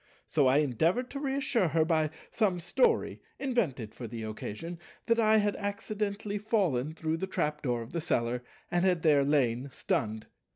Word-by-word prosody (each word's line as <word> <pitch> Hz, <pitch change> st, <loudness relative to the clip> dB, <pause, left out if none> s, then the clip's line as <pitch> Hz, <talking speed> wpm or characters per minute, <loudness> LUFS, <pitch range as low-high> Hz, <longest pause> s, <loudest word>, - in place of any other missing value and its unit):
So 145 Hz, -4 st, +3 dB
I 130 Hz, +2 st, +5 dB
endeavoured 160 Hz, -, +1 dB
to 280 Hz, -, -4 dB
reassure 270 Hz, -7 st, +1 dB
her 160 Hz, 0 st, +2 dB
by 160 Hz, -2 st, +2 dB, 0.2 s
some 195 Hz, -6 st, +1 dB
story, 460 Hz, -, +1 dB, 0.2 s
invented 185 Hz, -, -1 dB
for 120 Hz, -, -7 dB
the 115 Hz, 0 st, -6 dB
occasion, 110 Hz, +10 st, -6 dB, 0.3 s
that 230 Hz, 0 st, +2 dB
I 220 Hz, -1 st, +5 dB
had 205 Hz, -1 st, +2 dB
accidentally 205 Hz, 0 st, -3 dB
fallen 175 Hz, -, 0 dB
through 160 Hz, 0 st, -1 dB
the 190 Hz, -, -3 dB
trap 150 Hz, -5 st, -1 dB
door 120 Hz, -3 st, -1 dB
of 115 Hz, -, -12 dB
the 170 Hz, -, -1 dB
cellar, 120 Hz, -5 st, 0 dB, 0.3 s
and 175 Hz, 0 st, +2 dB
had 180 Hz, -3 st, +2 dB
there 150 Hz, -3 st, +5 dB
lain 135 Hz, -3 st, +1 dB
stunned. 110 Hz, -3 st, -2 dB
165 Hz, 170 wpm, -30 LUFS, 130-205 Hz, 0.3 s, I